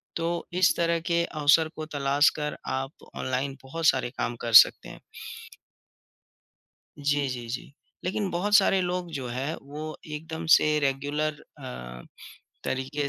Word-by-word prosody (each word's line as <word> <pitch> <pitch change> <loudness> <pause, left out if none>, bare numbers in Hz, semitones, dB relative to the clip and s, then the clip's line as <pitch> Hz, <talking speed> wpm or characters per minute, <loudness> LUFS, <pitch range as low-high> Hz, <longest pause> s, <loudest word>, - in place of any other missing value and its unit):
तो 170 +1 -2 0.2
इस - - +5
तरह 170 0 +1
के 170 0 +3
अवसर 155 +1 +3
को 155 - -5
तलाश 140 +1 +4
कर 150 0 -3 0.2
आप 135 +2 -8
ऑनलाइन 130 +2 -2
बहुत 165 +5 -5
सारे 130 -4 +3
काम 120 - -2
कर 115 - -3
सकते - - -10
हैं। - - -11 2.0
जी, 145 -1 +1
जी, 120 -2 -5
जी। 125 +3 -5 0.3
लेकिन 190 +2 -1
बहुत 200 +4 -1
सारे 195 -1 +5
लोग 180 -1 -2
जो 130 -3 -4
है 135 +7 -3
वो 150 +3 -7
एकदम 160 +2 -6
से 155 0 +2
रेगुलर 145 +2 -1 0.2
अ, 60 0 -8 0.6
तरीके 140 +2 -2
150 Hz, 140 wpm, -27 LUFS, 135-165 Hz, 2.0 s, इस